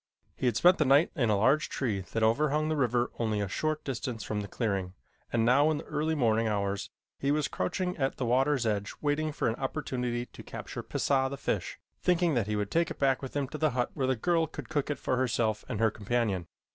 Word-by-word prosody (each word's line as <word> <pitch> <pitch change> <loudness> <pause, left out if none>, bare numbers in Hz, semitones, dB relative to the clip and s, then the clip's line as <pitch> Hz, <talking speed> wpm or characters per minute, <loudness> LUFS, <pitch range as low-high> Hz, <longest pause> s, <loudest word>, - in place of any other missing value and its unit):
He 130 - -1
had 120 - +2
spent 180 +1 +5
the 155 - +3
night 140 +4 +5
in 120 -8 +1
a 105 - +3
large 135 +9 +3
tree 110 -8 -1
that 115 - 0
overhung 150 +7 +2
the 155 - +1
river 125 -3 +1
only 110 -3 0
a 100 - -1
short 155 +9 -1
distance 125 -3 -4
from 105 -1 -2
the 100 - -5
clearing, 100 -5 -2 0.4
and 115 -1 +2
now 140 +6 +5
in 155 - +1
the - - -6
early 160 +1 -1
morning 115 -4 +2
hours 100 -1 -1 0.3
he 140 - 0
was 150 0 +2
crouching 180 - -2
at 135 -3 -1
the 130 - -1
water's 130 +2 +2
edge 105 -2 -1
waiting 155 +1 0
for 145 - -1
an 115 - +1
opportunity 125 -4 -2
to - - -13
capture - - -7
Pisah, 135 -1 +1
the 140 - -5
fish, - - -2 0.2
thinking 175 -2 +2
that 120 -6 +1
he 105 - -1
would 105 -1 -2
take 170 +1 +2
it - - -6
back 135 -2 +2
with 135 0 -7
him 140 -2 0
to 155 - -6
the 155 - +3
hut 125 - +1
where 135 -3 -1
the 130 - +2
girl 165 +6 +1
could - - -8
cook 150 -3 -1
it 145 - -1
for 130 - -1
herself 115 -4 0
and - - -3
her 110 -1 +3
companion. 105 -5 -1
130 Hz, 235 wpm, -29 LUFS, 110-150 Hz, 0.4 s, spent